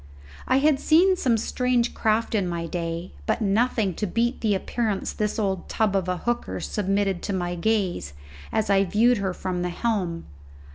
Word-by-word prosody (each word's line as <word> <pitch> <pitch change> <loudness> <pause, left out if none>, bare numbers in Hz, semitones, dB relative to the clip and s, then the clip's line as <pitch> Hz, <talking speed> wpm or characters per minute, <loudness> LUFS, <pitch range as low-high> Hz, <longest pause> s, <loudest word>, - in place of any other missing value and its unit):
I 260 - +4
had 285 0 +3
seen 360 +6 +4
some 250 -10 +1
strange 245 +1 0
craft 220 +1 0
in 200 -4 +1
my 170 -1 -3
day; 165 0 -4 0.2
but - - +1
nothing 215 -1 +1
to 210 - -1
beat 235 +6 0
the 210 -3 +2
appearance 210 +1 -2
this 210 -1 -2
old 195 -4 -2
tub 215 -3 +1
of 185 -2 0
a 180 - 0
hooker 240 +5 -2
submitted 195 -2 -1
to 200 - -3
my 175 -2 -2
gaze 180 - -1 0.4
as 215 -2 0
I 195 0 +5
viewed 225 +5 +3
her 195 -1 -1
from 180 0 -3
the 180 - -1
helm. 180 -4 -2
205 Hz, 180 wpm, -25 LUFS, 180-235 Hz, 0.4 s, I